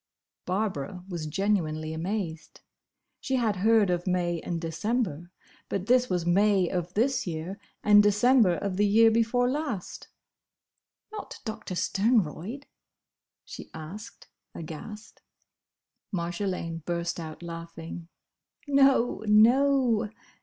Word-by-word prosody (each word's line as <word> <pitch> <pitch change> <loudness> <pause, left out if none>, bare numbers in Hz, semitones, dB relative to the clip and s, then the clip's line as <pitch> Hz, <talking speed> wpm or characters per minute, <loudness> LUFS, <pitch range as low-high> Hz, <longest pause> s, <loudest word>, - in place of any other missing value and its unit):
Barbara 185 -3 -2
was 170 -4 -4
genuinely 160 -3 -1
amazed. 165 -1 -4 0.6
She 265 - -2
had 225 -6 +1
heard 215 0 +4
of 175 +1 -2
May 175 -2 0
and 170 +1 -4
December, 175 - -2 0.4
but 195 -1 -2
this 250 +2 +3
was 180 -2 -1
May 195 +1 +3
of 180 -1 -3
this 250 +1 +1
year 170 +4 -5 0.2
and 205 0 +7
December 210 -1 +4
of 190 +1 -3
the 205 - +3
year 225 +2 +5
before 230 +2 +2
last. 270 - -4 1.0
"Not 430 -1 -8
Doctor 220 -4 -5
Sternroyd?" 210 - 0 0.8
she - - -10
asked 175 +8 -9 0.3
aghast. 170 +7 -9 0.9
Marjolaine 170 -2 -3
burst 170 +1 -2
out 160 0 -8
laughing. 165 0 -8 0.6
"No, 275 -5 +3
no!" 235 +1 +4
195 Hz, 110 wpm, -27 LUFS, 170-225 Hz, 1.0 s, and